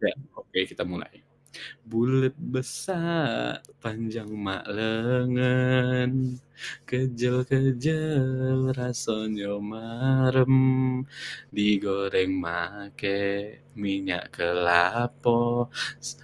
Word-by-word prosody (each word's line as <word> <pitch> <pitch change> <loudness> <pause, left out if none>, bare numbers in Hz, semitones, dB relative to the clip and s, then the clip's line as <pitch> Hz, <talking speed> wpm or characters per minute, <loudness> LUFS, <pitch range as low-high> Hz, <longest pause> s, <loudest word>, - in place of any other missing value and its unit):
Ya, - - +3 0.2
oke, - - -5
kita - - -5
mulai. 90 -1 -8 0.6
Bulet 130 +4 +2
besar 150 - -2 0.2
panjang 115 -1 -6
mak 95 -2 -4
lengan, 125 +3 +2 0.5
kejel-kejel 130 +1 +1
rasonyo 110 -5 -3
marem, 130 +3 +3 1.0
digoreng 100 -2 +2
make 100 +3 -3 0.6
minyak 95 -3 -2
kelapo, 115 +8 +2 0.3
s - - -5
120 Hz, 65 wpm, -27 LUFS, 105-130 Hz, 1.0 s, Ya